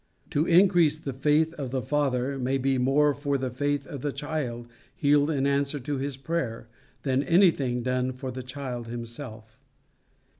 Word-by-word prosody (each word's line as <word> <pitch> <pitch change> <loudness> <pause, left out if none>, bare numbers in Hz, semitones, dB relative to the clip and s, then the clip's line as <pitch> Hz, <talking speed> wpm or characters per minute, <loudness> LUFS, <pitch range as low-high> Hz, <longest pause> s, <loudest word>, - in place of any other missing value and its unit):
To 150 +4 +1
increase 175 -4 +5
the 140 -4 -5
faith 150 +4 +2
of 135 -3 -3
the 130 0 -2
father 135 -2 0
may 130 +2 0
be 135 0 +1
more 145 +3 +3
for 140 0 -1
the 130 -1 -3
faith 145 +2 -1
of 140 -5 -7
the 145 - -1
child, 130 -6 -4 0.3
healed 145 0 +3
in 140 -3 0
answer 140 +1 +1
to 140 +2 -3
his 135 -1 -3
prayer, 135 -6 -3 0.4
than 135 -1 +1
anything 140 -6 +3
done 125 0 0
for 130 0 -6
the 130 +1 -6
child 125 -2 -6
himself. 115 -1 -8
135 Hz, 165 wpm, -27 LUFS, 125-145 Hz, 0.4 s, increase